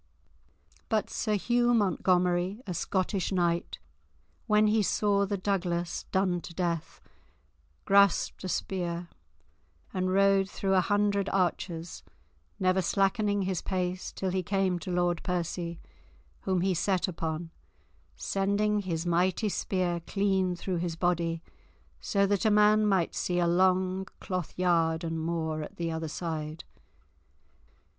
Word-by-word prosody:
But 215 -1 0
Sir 215 -1 0
Hugh 240 +3 +2
Montgomery, 180 -1 +1
a 185 - -4
Scottish 185 +2 -1
knight, 175 -2 0 0.7
when 210 0 +4
he 215 +1 +3
saw 200 0 +2
the 200 0 -1
Douglas 175 -3 -2
done 185 -2 +1
to 170 - -10
death, 170 -3 -2 0.9
grasped 200 -1 +3
a 185 - -3
spear 175 -2 -3 0.8
and 185 0 0
rode 195 0 +3
through 195 -1 -1
a 185 - +5
hundred 205 0 +1
archers, 175 -2 -2 0.6
never 185 0 +2
slackening 200 +2 +1
his 185 -1 -1
pace 185 -1 -2
till 190 -1 -3
he 185 0 0
came 190 -1 0
to 180 - -7
Lord 175 -1 +1
Percy, 170 -1 -3 0.6
whom 185 -2 0
he 190 +1 +2
set 185 +2 +1
upon, 165 -1 -4 0.6
sending 200 +2 0
his 175 -4 -3
mighty 180 +5 +1
spear 180 -3 -1
clean 190 -2 +1
through 180 +1 -3
his 170 -1 -2
body, 170 -1 0 0.6
so 200 -1 +1
that 200 -1 +1
a 220 - +4
man 210 0 +5
might 190 -5 +1
see 180 - -1
a 175 - +3
long 185 +2 +2
cloth 185 -4 -4
yard 165 -2 +2
and 165 -1 -2
more 160 -1 -2
at 150 - -8
the 170 -1 -2
other 160 0 -3
side. 155 -1 -4
185 Hz, 135 wpm, -29 LUFS, 170-195 Hz, 0.9 s, a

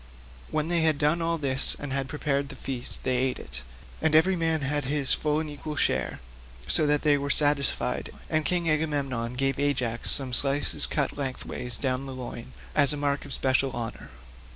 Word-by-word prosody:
When 155 0 -1
they 170 -1 +2
had 160 -2 +3
done 150 +4 +2
all 165 0 0
this 135 -3 +1
and 145 -2 -4
had 135 -1 -2
prepared 140 -1 -1
the - - -8
feast, 125 -2 -5
they 130 -1 +1
ate 130 0 0
it, - - -7 0.4
and 160 -1 +3
every 185 +4 +5
man 165 -2 +2
had 145 0 0
his 140 0 +1
full 150 0 0
and 160 - -3
equal 150 +1 -6
share, - - 0 0.5
so 150 - +3
that 150 +1 +1
all 145 -1 +5
were 140 0 -3
satisfied, 145 -2 +2 0.2
and 155 0 0
King 175 +1 +1
Agamemnon 140 -6 0
gave 135 +1 0
Ajax 125 -5 0
some 135 -3 +2
slices 140 +3 +2
cut 150 -3 -1
lengthways 125 -3 -2
down 130 0 -2
the 135 - -7
loin, 125 0 -8 0.2
as 145 0 +4
a - - -4
mark 145 0 -1
of 140 - -1
special 130 0 +2
honour. 115 -2 -6
140 Hz, 190 wpm, -27 LUFS, 130-150 Hz, 0.5 s, every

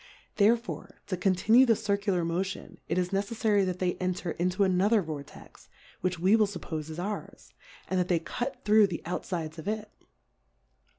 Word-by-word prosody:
Therefore, 230 +3 +1
to 185 - -2
conti 185 +3 0
nue 250 +3 +9
the 235 -3 +4
Circular 200 -4 0
Motion, 185 +4 -3
it - - 0
is 180 -1 +1
neceffary 205 +1 +1
that 180 -1 -2
they 180 -1 0
enter 180 -1 -2
into 180 +3 0
another 195 +3 +3
Vortex, 150 -3 -9 0.3
which 180 -1 -1
we 185 +6 +4
will 215 -2 +4
fuppofe 160 -5 -5
is 160 - -7
ours, 200 +4 -6 0.3
and 185 - 0
that 180 - +1
they 175 - +3
cut 240 +10 -5
through 210 0 +6
the 175 -3 -5
outfides 165 -2 -4
of 160 - -8
it. 215 0 -3
185 Hz, 170 wpm, -29 LUFS, 175-210 Hz, 0.3 s, nue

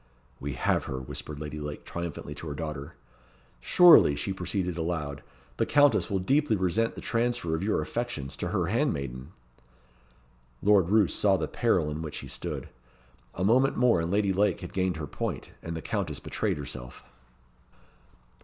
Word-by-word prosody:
"We 70 +1 -4
have - - 0
her," 65 - -4
whispered 70 +3 -6
Lady 75 0 -5
Lake 75 0 -6
triumphantly 85 -3 -5
to 80 - -8
her 75 - -4
daughter. 75 -2 -5 0.6
"Surely," 165 - +7
she 95 +7 -2
proceeded 90 -1 -2
aloud, 80 -4 -3 0.4
"the - - +2
Countess 145 -4 +4
will 100 - +1
deeply 135 +6 +2
resent 100 +4 0
the - - -7
transfer 115 -7 0
of 80 - -1
your 105 +2 0
affections 120 - -4
to - - -3
her - - 0
handmaiden." 70 +1 -2 1.3
Lord 100 -4 +4
Roos 105 -3 +4
saw 100 -2 +3
the 80 - -2
peril 90 -10 +1
in 75 +2 -4
which 75 -2 -5
he - - -7
stood. - - -5 0.7
A 90 - -2
moment 125 +7 +3
more 120 -8 +4
and 85 - -2
Lady 100 0 +2
Lake 100 -1 +1
had 90 - -8
gained 95 -3 0
her 80 - -4
point, - - -4
and 85 0 -5
the - - -7
Countess 90 -9 -2
betrayed - - -2
herself. 60 -3 -8
85 Hz, 165 wpm, -28 LUFS, 75-105 Hz, 1.3 s, Surely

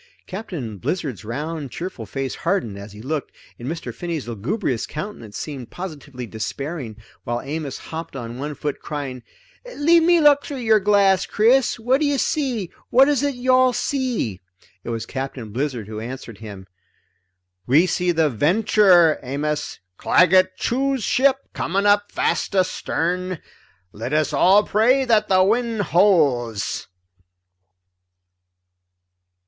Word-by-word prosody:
Captain 170 - -6
Blizzard's 135 - -3
round 145 +5 -4
cheerful 165 - -6
face 135 +4 -3
hardened 170 - -1
as 100 +1 -9
he 105 +2 -11
looked, 150 +2 -3 0.3
and 120 - -7
Mr. 165 +3 -5
Finney's 165 -7 -4
lugubrious 120 - -2
countenance 150 - -7
seemed 135 -6 -6
positively 145 -8 -7
despairing, 120 +3 -5 0.3
while 120 0 -2
Amos 145 -1 -4
hopped 165 -2 -7
on 120 -1 -6
one 145 +1 -4
foot 145 0 -4
crying: 140 -4 -5 0.5
"Leave 330 +3 +4
me 345 +1 +4
look 290 -2 +5
through 285 - -6
your 220 -3 +3
glass, 200 -2 +3
Chris! 240 +3 +3
What 255 +5 +1
do 300 - +3
you 285 -1 +1
see? 250 - -1 0.2
What 265 +2 +6
is 285 -3 +2
it 285 -2 0
you 255 +1 +1
all 255 0 +5
see?" 245 - -2 0.4
It - - -6
was 115 -1 -3
Captain 130 -4 -6
Blizzard 125 -3 -3
who 110 0 -6
answered 115 -1 -8
him. 100 -4 -9 1.0
"We 150 +8 +5
see 180 0 0
the 160 -2 +2
Venture, 175 - +4
Amos, 150 +3 -3 0.2
Claggett 185 +1 +4
Chew's 270 0 0
ship, 270 +5 +3
coming 195 +4 -1
up 205 0 +3
fast - - -1
astern. 180 -1 -1 0.5
Let 115 +6 -5
us 155 0 +1
all 195 +3 +5
pray 250 +7 +3
that 215 -3 +3
the 185 -1 +4
wind 230 +2 +1
holds." 140 - +2
165 Hz, 140 wpm, -22 LUFS, 130-215 Hz, 1.0 s, What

